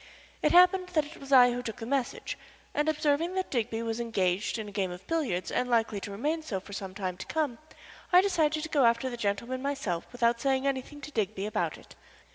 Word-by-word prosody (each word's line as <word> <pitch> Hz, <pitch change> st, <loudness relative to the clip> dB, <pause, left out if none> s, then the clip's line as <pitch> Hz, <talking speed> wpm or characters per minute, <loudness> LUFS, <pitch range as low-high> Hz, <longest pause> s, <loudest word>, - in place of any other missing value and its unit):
It -, -, +3 dB
happened 365 Hz, +1 st, +6 dB
that 310 Hz, -3 st, +3 dB
it 310 Hz, +3 st, -11 dB
was 275 Hz, 0 st, -11 dB
I 250 Hz, -2 st, +8 dB
who 245 Hz, +1 st, -2 dB
took 225 Hz, -3 st, -5 dB
the 225 Hz, -, -6 dB
message, 265 Hz, 0 st, -2 dB, 0.4 s
and 300 Hz, +1 st, +1 dB
observing 310 Hz, +3 st, +1 dB
that 375 Hz, -1 st, -2 dB
Digby 230 Hz, -2 st, -1 dB
was 225 Hz, 0 st, -2 dB
engaged 200 Hz, -4 st, 0 dB
in 220 Hz, -2 st, -5 dB
a -, -, -8 dB
game 195 Hz, -2 st, -1 dB
of 180 Hz, +1 st, -9 dB
billiards, 255 Hz, -, -1 dB
and 250 Hz, -, 0 dB
likely 225 Hz, -3 st, +2 dB
to 200 Hz, -, -7 dB
remain 295 Hz, +11 st, -1 dB
so 235 Hz, -12 st, -3 dB
for 200 Hz, -, -12 dB
some 195 Hz, -1 st, -6 dB
time 185 Hz, -3 st, -3 dB
to 190 Hz, -, -7 dB
come, 295 Hz, -7 st, -1 dB, 0.5 s
I 360 Hz, -, +8 dB
decided 315 Hz, -6 st, +1 dB
to 320 Hz, -, -4 dB
go 280 Hz, -5 st, +4 dB
after 235 Hz, +2 st, +2 dB
the -, -, -4 dB
gentleman 235 Hz, +4 st, -2 dB
myself 270 Hz, -12 st, -2 dB
without 235 Hz, -1 st, +1 dB
saying 270 Hz, -1 st, +1 dB
anything 275 Hz, +2 st, -2 dB
to 300 Hz, -, -8 dB
Digby 210 Hz, -4 st, -1 dB
about 215 Hz, -, -1 dB
it. -, -, -16 dB
245 Hz, 225 wpm, -29 LUFS, 210-295 Hz, 0.5 s, I